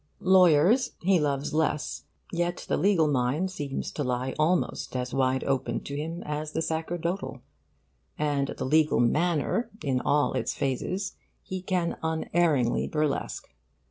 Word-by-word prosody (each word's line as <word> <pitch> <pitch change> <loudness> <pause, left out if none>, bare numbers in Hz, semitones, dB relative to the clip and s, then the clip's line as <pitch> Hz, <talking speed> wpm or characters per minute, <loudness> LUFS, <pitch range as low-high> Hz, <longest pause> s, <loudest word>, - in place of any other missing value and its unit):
Lawyers 185 - +5
he 185 0 +3
loves 145 -1 -1
less; 155 -1 -1 0.3
yet 175 0 -2
the - - +1
legal 185 -5 +3
mind 145 +7 0
seems 145 -7 -4
to 145 - -3
lie 125 0 -1
almost 165 -3 0
as 125 0 -2
wide 130 -1 +1
open 135 -1 -1
to 140 - -6
him 165 +4 -4
as 150 +1 -4
the 160 - 0
sacerdotal; 165 -2 -3 0.7
and 145 -2 0
the - - -3
legal 155 +3 +3
manner 170 - +1
in 130 -3 0
all 145 0 +2
its 130 -3 -1
phases 185 +9 -2 0.3
he 185 0 -5
can 180 -2 -1
unerringly 160 -5 +1
burlesque. 150 -2 -2
155 Hz, 140 wpm, -27 LUFS, 140-175 Hz, 0.7 s, Lawyers